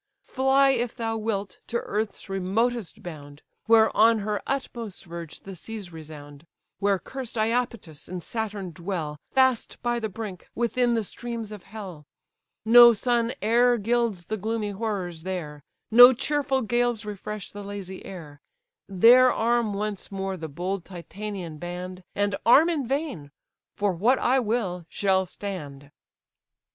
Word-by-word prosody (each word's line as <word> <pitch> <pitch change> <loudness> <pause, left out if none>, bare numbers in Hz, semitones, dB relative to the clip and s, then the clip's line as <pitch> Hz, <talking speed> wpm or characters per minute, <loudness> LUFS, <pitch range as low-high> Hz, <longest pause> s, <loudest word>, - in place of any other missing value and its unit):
Fly, 270 +1 +3
if 240 -3 -1
thy 225 -2 -2
wilt, 210 -3 -3
to 235 - -1
earth's 215 -2 -3
remotest 200 +3 -1
bound, 145 -4 -10 0.2
Where 220 -1 +5
on 225 +1 +6
her 210 0 -2
utmost 235 -7 -4
verge 170 -2 -8
the 195 -1 -9
seas 200 -1 -8
resound; 150 -1 -11 0.3
Where 200 0 +2
cursed 255 +3 -7
Iapetus 220 -8 -2
and 180 -1 -5
Saturn 210 -5 -4
dwell, 165 -3 -4
Fast 260 -3 +2
by 240 0 0
the 220 -2 -3
brink, 200 -2 -7
within 240 +1 +1
the 225 - 0
streams 230 +1 -6
of 210 -3 -8
hell; 185 -9 -9 0.6
No 240 +1 +9
sun 235 +1 +1
e'er 240 +3 +4
gilds 225 -4 0
the 220 - -3
gloomy 215 0 -2
horrors 195 -6 -3
there; 160 -5 -5 0.3
No 245 +3 +10
cheerful 270 0 0
gales 240 0 0
refresh 210 0 -6
the 205 - -8
lazy 200 -2 -7
air: 155 -7 -10 0.5
There 240 +7 +6
arm 230 -2 +1
once 205 -1 -4
more 195 -1 -3
the 160 -3 -6
bold 180 +5 -3
Titanian 185 -2 -7
band; 180 +2 -6
And 205 0 +1
arm 295 +8 +6
in 290 -7 -2
vain; 270 - -3 0.5
for 205 -2 +1
what 225 +10 +3
I 260 +2 +2
will, 210 -7 -1
shall 190 -2 +1
stand." 145 -9 -7
210 Hz, 145 wpm, -26 LUFS, 180-235 Hz, 0.6 s, No